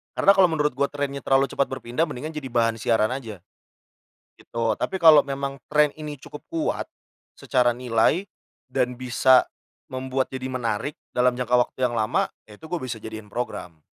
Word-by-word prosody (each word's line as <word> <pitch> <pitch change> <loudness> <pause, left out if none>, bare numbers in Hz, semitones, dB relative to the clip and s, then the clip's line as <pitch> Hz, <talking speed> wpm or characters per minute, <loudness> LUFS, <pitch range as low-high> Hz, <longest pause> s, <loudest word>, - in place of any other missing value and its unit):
Karena 195 - +6
kalau 190 -2 +6
menurut 150 -2 +1
gue 140 +2 +1
trennya 140 -1 -3
terlalu 135 0 +3
cepat 140 - +1
berpindah 130 +5 -2
mendingan 150 +6 -6
jadi 150 -3 -5
bahan 115 -1 +1
siaran 110 0 +2
aja, 110 -9 -7 1.0
gitu. 115 -1 -1
Tapi 190 - -3
kalau 160 -4 +8
memang 140 0 -4
tren 150 -1 +4
ini 150 -1 -7
cukup 145 +3 -11
kuat 330 -2 -2 0.5
secara 125 -2 +2
nilai, 125 - +2 0.5
dan 125 -1 0
bisa 130 0 +4 0.4
membuat 130 0 -3
jadi 130 0 -4
menarik 125 +2 -2 0.2
dalam 125 0 +2
jangka 125 -1 -2 0.2
waktu 130 - -1
yang 120 - -1
lama, 110 -2 +1 0.2
ya 105 - -13
itu - - -13
gue 175 +2 -3
bisa 125 -3 -4
jadiin 110 -1 -9
program. 100 -8 -5
130 Hz, 170 wpm, -24 LUFS, 120-145 Hz, 1.0 s, kalau